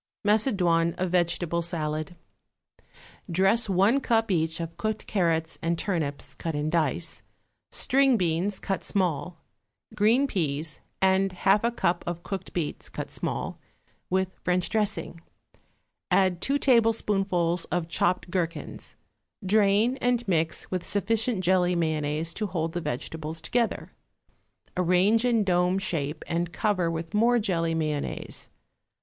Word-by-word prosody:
=Macedoine 180 Hz, -7 st, +2 dB
of 185 Hz, -1 st, -1 dB
Vegetable 170 Hz, -1 st, +1 dB
Salad.= 155 Hz, -1 st, -2 dB, 1.1 s
Dress 195 Hz, +6 st, +3 dB
one 195 Hz, +8 st, +4 dB
cup, 225 Hz, -4 st, +1 dB
each, 160 Hz, -2 st, +1 dB
of 165 Hz, 0 st, -5 dB
cooked 215 Hz, +5 st, -3 dB
carrots 165 Hz, -5 st, 0 dB
and 170 Hz, 0 st, 0 dB
turnips, 160 Hz, -7 st, -3 dB
cut 165 Hz, -2 st, -4 dB
in 150 Hz, +1 st, -1 dB
dice, 165 Hz, +1 st, 0 dB, 0.5 s
string 270 Hz, -2 st, +3 dB
beans, 180 Hz, +2 st, 0 dB
cut 195 Hz, -, -3 dB
small, 180 Hz, -3 st, -1 dB, 0.6 s
green 230 Hz, +7 st, +3 dB
peas, 155 Hz, -, -2 dB, 0.2 s
and 190 Hz, 0 st, +3 dB
half 195 Hz, +3 st, +2 dB
a 235 Hz, -, +3 dB
cup 175 Hz, -7 st, 0 dB
of 175 Hz, 0 st, -4 dB
cooked 195 Hz, -1 st, -5 dB
beets, 165 Hz, -4 st, -3 dB
cut -, -, -6 dB
small, -, -, -3 dB, 0.5 s
with 190 Hz, 0 st, +1 dB
French 180 Hz, 0 st, +1 dB
dressing; 210 Hz, -6 st, -1 dB, 0.9 s
add 185 Hz, -2 st, +2 dB
two 275 Hz, +6 st, +2 dB
tablespoonfuls 200 Hz, -9 st, +2 dB
of 175 Hz, -2 st, -2 dB
chopped 180 Hz, +1 st, 0 dB
gherkins; 170 Hz, -2 st, -4 dB, 0.5 s
drain, 210 Hz, +5 st, +3 dB
and 245 Hz, -2 st, 0 dB
mix 160 Hz, -3 st, 0 dB
with 185 Hz, -2 st, -2 dB
sufficient 220 Hz, +1 st, 0 dB
jelly 180 Hz, 0 st, +3 dB
mayonnaise 160 Hz, 0 st, -1 dB
to 215 Hz, +3 st, -2 dB
hold 165 Hz, -3 st, -2 dB
the 175 Hz, -, -2 dB
vegetables 155 Hz, +4 st, -5 dB
together. 230 Hz, +8 st, -1 dB, 0.8 s
Arrange 185 Hz, +5 st, +3 dB
in 235 Hz, -3 st, +3 dB
dome 180 Hz, 0 st, +2 dB
shape 160 Hz, -6 st, -2 dB
and 170 Hz, 0 st, -2 dB
cover 190 Hz, -5 st, 0 dB
with 165 Hz, 0 st, -5 dB
more 235 Hz, +3 st, +4 dB
jelly 170 Hz, -7 st, 0 dB
mayonnaise. 155 Hz, -2 st, -3 dB
180 Hz, 130 wpm, -27 LUFS, 165-205 Hz, 1.1 s, one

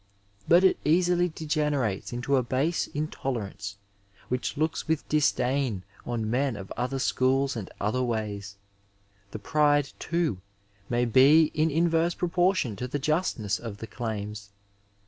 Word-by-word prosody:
But 175 Hz, +2 st, +6 dB
it 190 Hz, -, +4 dB
easily 175 Hz, +3 st, +3 dB
degenerates 150 Hz, -, -1 dB
into 125 Hz, +3 st, 0 dB
a 130 Hz, -, +4 dB
base 135 Hz, +8 st, 0 dB
intolerance 110 Hz, -9 st, -4 dB, 0.5 s
which 125 Hz, +2 st, -2 dB
looks 155 Hz, -1 st, -1 dB
with 160 Hz, -1 st, -1 dB
disdain 130 Hz, -7 st, +1 dB, 0.2 s
on 115 Hz, -3 st, -2 dB
men 130 Hz, +2 st, 0 dB
of 95 Hz, -2 st, -9 dB
other 125 Hz, +3 st, -2 dB
Bchoob 135 Hz, +1 st, +1 dB
and 105 Hz, -5 st, -5 dB
other 105 Hz, +5 st, 0 dB
ways. 105 Hz, -4 st, -3 dB, 0.7 s
The 105 Hz, -, -6 dB
pride, 145 Hz, +4 st, +2 dB
too, 160 Hz, -, -1 dB, 0.5 s
may 120 Hz, 0 st, +1 dB
be 145 Hz, +7 st, +6 dB
in 155 Hz, +1 st, +2 dB
in 165 Hz, +3 st, +2 dB
verse 165 Hz, +1 st, +1 dB
proportion 175 Hz, -, +1 dB
to 125 Hz, -, -3 dB
the 135 Hz, -, -2 dB
justness 145 Hz, -, 0 dB
of 115 Hz, -4 st, -7 dB
the 115 Hz, -, -7 dB
claims. 105 Hz, -3 st, -5 dB
130 Hz, 140 wpm, -27 LUFS, 110-155 Hz, 0.7 s, But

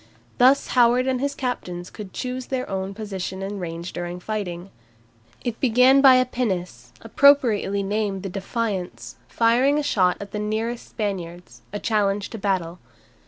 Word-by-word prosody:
Thus 260 Hz, +3 st, +5 dB
Howard 245 Hz, 0 st, +4 dB
and 260 Hz, -1 st, 0 dB
his 280 Hz, 0 st, -1 dB
captains 180 Hz, -10 st, -4 dB
could 205 Hz, -3 st, -9 dB
choose 255 Hz, +3 st, -5 dB
their 260 Hz, -1 st, -3 dB
own 195 Hz, 0 st, -4 dB
position 195 Hz, -3 st, -5 dB
and 200 Hz, 0 st, -5 dB
range 170 Hz, 0 st, -6 dB
during 175 Hz, 0 st, -5 dB
the 180 Hz, -, -15 dB
fighting. 190 Hz, -4 st, -4 dB, 0.7 s
It 235 Hz, -2 st, -3 dB
began 255 Hz, +2 st, +5 dB
by 265 Hz, -2 st, +8 dB
a 255 Hz, 0 st, +4 dB
pinnace, 180 Hz, -, -3 dB
appropriately 225 Hz, -6 st, +3 dB
named 200 Hz, -1 st, -2 dB
the 195 Hz, -, -4 dB
"Defiance," 195 Hz, -1 st, -4 dB
firing 245 Hz, +5 st, +3 dB
a 300 Hz, -, 0 dB
shot 185 Hz, -9 st, +2 dB
at 200 Hz, -1 st, -8 dB
the 210 Hz, -, -4 dB
nearest 220 Hz, +3 st, -3 dB
Spaniards, 180 Hz, -5 st, -5 dB
a 205 Hz, -, -3 dB
challenge 205 Hz, -2 st, 0 dB
to 225 Hz, -, -6 dB
battle. 185 Hz, -4 st, -1 dB
210 Hz, 160 wpm, -23 LUFS, 190-245 Hz, 0.7 s, by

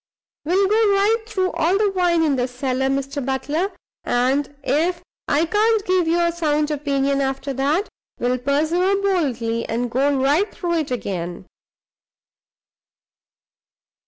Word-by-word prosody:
We'll 380 Hz, +5 st, +2 dB
go 425 Hz, 0 st, +3 dB
right 435 Hz, +3 st, +2 dB
through 375 Hz, -4 st, -1 dB
all 350 Hz, +5 st, +1 dB
the 415 Hz, -1 st, +2 dB
wine 350 Hz, -3 st, +2 dB
in 295 Hz, -3 st, +2 dB
the 250 Hz, -1 st, 0 dB
cellar, 255 Hz, +1 st, -2 dB
Mr. 275 Hz, +1 st, -2 dB
Butler; 290 Hz, +8 st, -1 dB, 0.3 s
and 260 Hz, +4 st, +1 dB
if 340 Hz, +7 st, 0 dB, 0.2 s
I 300 Hz, +4 st, +2 dB
can't 430 Hz, +3 st, +2 dB
give 365 Hz, -2 st, +2 dB
you 335 Hz, +1 st, +2 dB
a 340 Hz, 0 st, +2 dB
sound 305 Hz, -3 st, 0 dB
opinion 280 Hz, -1 st, 0 dB
after 270 Hz, +1 st, -2 dB
that, 290 Hz, -, 0 dB, 0.3 s
we'll 250 Hz, +1 st, 0 dB
persevere 320 Hz, +9 st, +1 dB
boldly, 255 Hz, -, 0 dB
and 240 Hz, +1 st, -2 dB
go 275 Hz, +3 st, +2 dB
right 295 Hz, +10 st, +2 dB
through 340 Hz, -2 st, -1 dB
it 305 Hz, -, -3 dB
again. 185 Hz, -7 st, -4 dB
300 Hz, 135 wpm, -21 LUFS, 265-365 Hz, 0.3 s, go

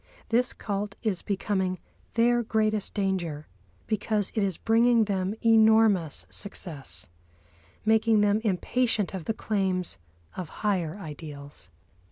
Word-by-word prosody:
This 245 Hz, +2 st, +2 dB
cult 200 Hz, -1 st, -4 dB
is 205 Hz, -5 st, 0 dB
becoming 190 Hz, -2 st, -1 dB, 0.4 s
their 240 Hz, +1 st, +4 dB
greatest 215 Hz, -2 st, 0 dB
danger, 180 Hz, -7 st, -1 dB, 0.4 s
because 210 Hz, -1 st, 0 dB
it 220 Hz, -, 0 dB
is 195 Hz, -4 st, 0 dB
bringing 230 Hz, +1 st, +4 dB
them 195 Hz, 0 st, -1 dB
enormous 220 Hz, -7 st, +4 dB
success, 165 Hz, -, -4 dB, 0.8 s
making 220 Hz, 0 st, +4 dB
them 205 Hz, +1 st, +3 dB
impatient 220 Hz, +1 st, 0 dB
of 185 Hz, -4 st, -5 dB
the 225 Hz, -, -1 dB
claims 185 Hz, -, -1 dB, 0.4 s
of 180 Hz, -4 st, -5 dB, 0.2 s
higher 185 Hz, -4 st, 0 dB
ideals. 145 Hz, -, -9 dB
205 Hz, 115 wpm, -27 LUFS, 185-220 Hz, 0.8 s, their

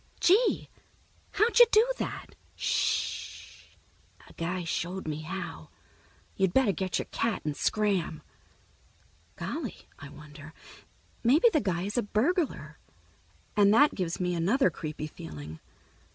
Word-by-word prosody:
"Gee, 415 Hz, +7 st, +3 dB, 0.7 s
how'd 450 Hz, +4 st, +3 dB
you 485 Hz, -, +10 dB
do 440 Hz, +3 st, +5 dB
that?" -, -, -5 dB, 0.2 s
"Sh -, -, -2 dB
h -, -, -29 dB, 0.4 s
h. -, -, -19 dB
A -, -, -17 dB
guy 175 Hz, +2 st, -3 dB
showed 175 Hz, +2 st, -3 dB
me 155 Hz, 0 st, -3 dB
how. 185 Hz, +5 st, -6 dB, 0.7 s
You 195 Hz, -, +2 dB
better 215 Hz, +4 st, +3 dB
get 185 Hz, +1 st, -2 dB
your -, -, -3 dB
cat 225 Hz, -3 st, -1 dB
and 150 Hz, -1 st, -2 dB
scram." 185 Hz, -8 st, 0 dB, 1.1 s
Golly, -, -, -5 dB
I 140 Hz, -, -9 dB
wonder, 150 Hz, +1 st, -12 dB, 0.7 s
maybe 295 Hz, -, +5 dB
the 305 Hz, -, +3 dB
guy 180 Hz, -3 st, -1 dB
is 205 Hz, +5 st, -1 dB
a -, -, +2 dB
burglar, 220 Hz, -, -1 dB, 0.8 s
and 205 Hz, -1 st, +5 dB
that 290 Hz, +5 st, +5 dB
gives 175 Hz, -3 st, -3 dB
me 180 Hz, -1 st, 0 dB
another 205 Hz, +12 st, +2 dB
creepy 155 Hz, -2 st, -6 dB
feeling. 80 Hz, -, -9 dB
185 Hz, 135 wpm, -29 LUFS, 155-240 Hz, 1.1 s, you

